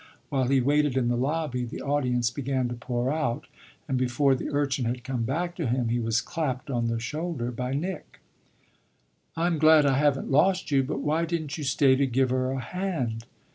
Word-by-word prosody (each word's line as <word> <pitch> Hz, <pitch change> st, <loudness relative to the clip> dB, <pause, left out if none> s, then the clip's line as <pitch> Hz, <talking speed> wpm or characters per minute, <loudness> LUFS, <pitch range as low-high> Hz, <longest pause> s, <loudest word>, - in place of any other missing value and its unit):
While 135 Hz, -2 st, +1 dB
he 135 Hz, 0 st, +3 dB
waited 145 Hz, 0 st, +2 dB
in 120 Hz, -2 st, +2 dB
the 120 Hz, -, +1 dB
lobby 135 Hz, 0 st, -1 dB
the 120 Hz, -, -6 dB
audience 125 Hz, -4 st, +1 dB
began 130 Hz, -1 st, -1 dB
to -, -, -3 dB
pour 120 Hz, +1 st, -2 dB
out, 150 Hz, -7 st, -1 dB, 0.4 s
and 130 Hz, -, 0 dB
before 130 Hz, +2 st, +2 dB
the 130 Hz, -, -3 dB
urchin 140 Hz, -3 st, 0 dB
had 120 Hz, +1 st, -2 dB
come 130 Hz, -3 st, -3 dB
back 170 Hz, +8 st, -2 dB
to 165 Hz, -6 st, -1 dB
him 120 Hz, 0 st, 0 dB
he 120 Hz, +1 st, +1 dB
was 115 Hz, 0 st, +1 dB
clapped 140 Hz, -2 st, -3 dB
on 120 Hz, -2 st, 0 dB
the 115 Hz, 0 st, -1 dB
shoulder 140 Hz, 0 st, -3 dB
by 125 Hz, +2 st, -3 dB
Nick. 175 Hz, +4 st, -5 dB, 1.2 s
"I'm 165 Hz, -1 st, +1 dB
glad 155 Hz, -1 st, +6 dB
I 135 Hz, -1 st, +3 dB
haven't 145 Hz, -2 st, +1 dB
lost 180 Hz, +5 st, +3 dB
you, 135 Hz, -1 st, +4 dB
but 135 Hz, +1 st, -3 dB
why 155 Hz, +3 st, +1 dB
didn't 160 Hz, -4 st, -3 dB
you -, -, -4 dB
stay 135 Hz, 0 st, +4 dB
to 140 Hz, 0 st, +2 dB
give 130 Hz, 0 st, +1 dB
her 130 Hz, 0 st, +1 dB
a 135 Hz, 0 st, -2 dB
hand?" 130 Hz, -7 st, -3 dB
135 Hz, 200 wpm, -27 LUFS, 125-150 Hz, 1.2 s, glad